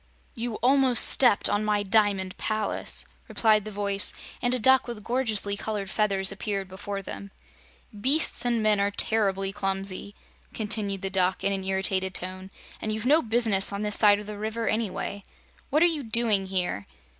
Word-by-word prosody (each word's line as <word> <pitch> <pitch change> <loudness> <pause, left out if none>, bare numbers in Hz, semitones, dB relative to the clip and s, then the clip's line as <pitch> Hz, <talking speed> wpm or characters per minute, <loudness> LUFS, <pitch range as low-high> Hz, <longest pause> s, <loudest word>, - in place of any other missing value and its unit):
"You 235 -1 -5
almost 260 -2 +5
stepped 245 -6 +4
on 205 +1 0
my 210 -1 0
Diamond 200 -2 +1
Palace," 215 -1 -2 0.2
replied 215 -2 +2
the 215 - -6
voice, 200 -1 -1 0.3
and 245 - 0
a 255 - +2
duck 260 +3 +4
with 235 -3 -7
gorgeously 220 -4 -1
colored 205 -2 -5
feathers 195 -3 0
appeared 195 -1 -4
before 195 +1 -6
them. 200 +1 -8 0.6
"Beasts 260 +4 +2
and 235 -2 0
men 210 -1 +3
are 200 0 +1
terribly 195 -2 0
clumsy," 195 0 -3 0.4
continued 205 -3 0
the 195 - -2
Duck 185 -1 0
in 200 - +1
an 195 -1 -3
irritated 190 0 -1
tone, 185 +1 -3 0.3
"and 215 - -3
you've 215 +1 -4
no 300 +5 +4
business 225 -5 +2
on 200 +1 -4
this 210 -1 +2
side 205 -1 +6
of 210 - -9
the 210 0 -8
River, 220 +2 -3
anyway. 205 -2 -2 0.5
What 305 +4 +3
are - - +6
you 325 -4 0
doing 220 -5 0
here?" 180 - -3
205 Hz, 170 wpm, -26 LUFS, 195-225 Hz, 0.6 s, side